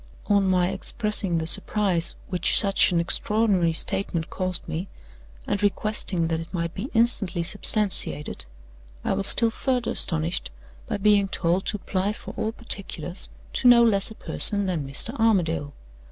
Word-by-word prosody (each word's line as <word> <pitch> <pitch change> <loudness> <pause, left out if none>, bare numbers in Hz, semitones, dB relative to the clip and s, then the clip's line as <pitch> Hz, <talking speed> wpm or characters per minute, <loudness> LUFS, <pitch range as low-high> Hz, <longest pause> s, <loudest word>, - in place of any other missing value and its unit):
On 200 -1 +2
my 180 -1 +2
expressing 210 -5 -1
the 160 - -2
surprise 190 -1 +2
which 180 -2 +3
such 195 -2 +3
an 170 - +1
extraordinary 190 0 +1
statement 165 0 -1
caused 185 -2 -2
me, 165 +4 -5 0.6
and 200 - -2
requesting 205 -4 -1
that 165 -1 -1
it 165 - -9
might 170 -2 -3
be 220 +8 -6
instantly 225 -7 +1
substantiated, 200 - +1 0.6
I - - 0
was 195 - 0
still 230 -1 +5
further 250 0 -2
astonished 165 - -1 0.4
by - - -3
being 200 -1 +3
told 180 0 -1
to 210 - +1
apply 195 +1 -2
for - - -10
all 220 - -3
particulars 195 -6 -5 0.2
to 250 - +1
no 240 -1 +7
less 200 -4 +2
a 220 - -11
person 205 -2 +2
than 165 -7 -3
Mr. 140 - 0
Armadale. 170 -10 +1
195 Hz, 155 wpm, -24 LUFS, 170-210 Hz, 0.6 s, no